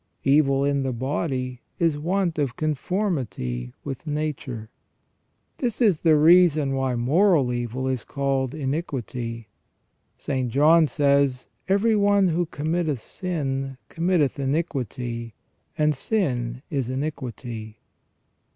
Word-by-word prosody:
Evil 140 -1 +3
in 140 -1 +1
the 135 -1 -1
body 130 0 -2 0.2
is 165 -3 +2
want 170 +2 -1
of 135 -4 -1
conformity 135 - -2
with 140 +3 -6
nature."* 135 -7 -4 0.9
This 240 -4 -1
is 205 -10 +4
the 160 -2 +4
reason 155 -3 +5
why 135 -2 0
moral 140 +1 +3
evil 120 +2 -3
is 130 -3 -1
called 135 -1 -1
iniquity. 130 - -4 0.7
St. 130 -3 -2
John 155 +6 +5
says: 140 -3 +2
" - - -29
Every 210 +3 +3
one 200 -2 +4
who 170 +1 0
committeth 155 -2 -1
sin, 135 -4 -3
committeth 165 -5 +1
iniquity: 125 - -2 0.4
and 150 0 +3
sin 130 - -1
is 135 -5 -1
iniquity 125 -5 -5
140 Hz, 115 wpm, -24 LUFS, 125-165 Hz, 0.9 s, reason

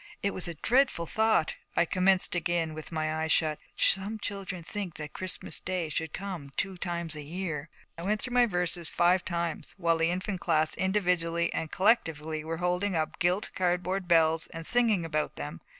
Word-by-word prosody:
It 200 - +1
was 185 - -2
a 170 - -5
dreadful 245 - +2
thought. 220 -3 +2 0.2
I - - +4
commenced 185 +2 +2
again, 170 -2 0
with 155 +2 -7
my 155 -1 -1
eyes 160 0 0
shut, 155 -2 +2 0.2
'Some 200 +3 +2
children 195 -4 -4
think 195 -1 -5
that 150 -1 -7
Christmas 185 -1 -4
day 180 -3 -2
Should 160 +1 -2
come 185 -7 -5
two 195 -1 -1
times 170 -2 -3
a 150 - -5
year.' 160 -1 -4 0.3
I - - -5
went 210 +4 0
through 245 +2 -4
my 245 -1 +5
verses 175 -3 0
five 180 +1 +3
times, 170 -2 -3
while 170 -3 +2
the 165 0 +3
Infant 185 +2 -2
Class 155 0 +2
individually 180 -3 +1
and 160 - -2
collectively 160 -7 +1
were 165 +1 -3
holding 180 +2 0
up 155 -1 -1
gilt 180 +5 +1
cardboard 180 +1 0
bells 165 -2 +4
and 165 0 -7
singing 225 -7 +3
about 155 -2 -1
them. 75 +3 -6
175 Hz, 180 wpm, -29 LUFS, 160-190 Hz, 0.3 s, my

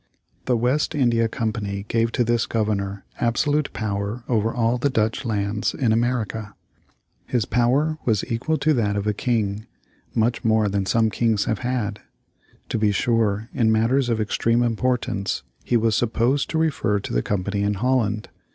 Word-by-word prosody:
The 125 -2 +2
West 130 +7 +1
India 120 -5 +2
Company 110 -4 -3
gave 115 0 +1
to 125 - +2
this 120 0 +1
Governor 100 -3 -2
absolute 145 +5 +1
power 105 +2 -3
over 115 -2 +1
all 120 +1 +1
the 140 - +1
Dutch 110 -1 0
lands 105 -2 -1
in 120 -4 +1
America. 115 -2 -1 0.7
His 120 -5 0
power 140 +6 +1
was 110 -5 +1
equal 125 +7 -1
to 155 0 +2
that 105 -6 +1
of 100 0 -2
a 105 - +1
king; 110 -1 -1 0.5
much 115 +3 +1
more 110 -2 +3
than 100 -1 -1
some 110 0 +2
kings 110 -4 +1
have 110 - -1
had. 120 -5 -2 0.7
To - - -1
be 105 -1 +3
sure, 110 0 +1
in 110 -2 +2
matters 120 +4 +2
of 115 -2 +1
extreme 115 +2 +1
importance 115 - -1 0.2
he 120 - +2
was 110 -1 +2
supposed 120 +4 +1
to 160 - -1
refer 145 -10 +1
to - - -6
the - - +2
Company 100 0 -2
in 100 0 +1
Holland. 110 -2 0
115 Hz, 165 wpm, -23 LUFS, 105-120 Hz, 0.7 s, more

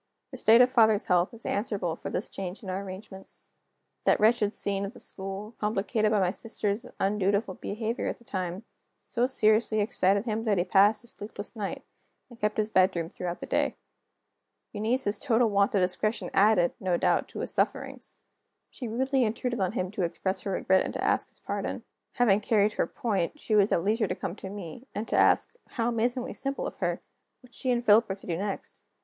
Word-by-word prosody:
The - - -7
state 230 +2 +6
of 250 0 +5
father's 220 -4 +4
health 180 0 +2
is 230 -1 -11
answerable 200 -5 -1
for - - -6
this 195 - -2
change 190 +2 -6
in 190 - -4
our 190 +1 -2
arrangements. 190 0 -10 0.6
That - - +4
wretched 215 -1 +3
scene 200 -2 0
at 200 +5 -5
the - - -11
school, 195 +2 -6
complicated 215 +1 0
by 210 -1 +2
my 180 -2 +2
sister's 210 0 -3
undutiful 200 0 +1
behavior 220 +5 -3
at - - -3
the - - -21
time, 185 -2 -4 0.4
so 245 +1 0
seriously 215 -3 +3
excited 200 -1 +2
him 225 -1 -2
that 210 -3 +2
he 175 - +3
passed 200 +4 +4
a - - -12
sleepless 205 0 -7
night, 205 -3 -4 0.5
and 235 - -14
kept 210 0 0
his 215 0 0
bedroom 185 -4 +2
throughout 175 -1 -5
the - - -4
day. - - 0 1.0
Eunice's 215 0 0
total 230 0 +2
want 200 +1 +2
of 195 - +3
discretion 200 +5 0
added, 195 -3 +4
no 180 -2 0
doubt, - - +2
to - - -7
his - - -3
sufferings: - - -2 0.5
she 250 - -6
rudely 265 +3 +1
intruded 235 +2 -1
on 190 0 0
him 185 -5 -2
to 205 - -4
express 185 +2 -1
her 200 - -4
regret 190 0 +3
and - - -5
to - - -2
ask - - +1
his - - -11
pardon. - - -4 0.3
Having 215 -5 +4
carried 210 -1 +2
her - - 0
point, 215 - -2
she 220 - -3
was 205 -1 +4
at 170 - +2
leisure 215 +2 +1
to 180 - -2
come 185 -1 -4
to 190 - -7
me, 200 +4 -8
and 215 +2 -3
to - - -1
ask - - +4
(how 230 -1 -1
amazingly 240 +2 -1
simple 275 0 -3
of - - -6
her!) - - -2 0.4
what 250 -1 -18
she 260 - -2
and 240 -1 +1
Philip 215 +1 +6
were 190 - -1
to 195 - -16
do 170 - -2
next. 195 +3 -5
210 Hz, 205 wpm, -28 LUFS, 190-225 Hz, 1.0 s, state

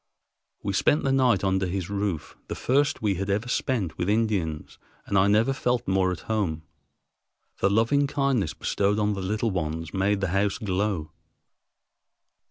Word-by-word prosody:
We - - -1
spent 150 - +2
the 135 - +1
night 125 -7 +3
under 95 -1 +1
his 90 -1 -3
roof, 100 -5 -3
the - - -4
first 145 +1 +1
we 105 -2 +2
had 100 - -3
ever 105 +4 0
spent 120 - -1
with 90 +2 0
Indians, 100 -8 -1 0.3
and 100 - -2
I 95 +1 +5
never 110 +6 +3
felt 125 -2 -1
more 95 -1 +2
at 90 - -5
home. 95 -8 -2 1.0
The 95 - +3
loving 115 +8 +3
kindness 135 - 0
bestowed 100 +1 0
on 105 0 +1
the 100 - -4
little 105 +4 -1
ones 80 -2 -3
made 95 +1 +1
the 95 -2 -1
house 95 +2 +1
glow. 95 -5 -2
100 Hz, 165 wpm, -26 LUFS, 95-115 Hz, 1.0 s, I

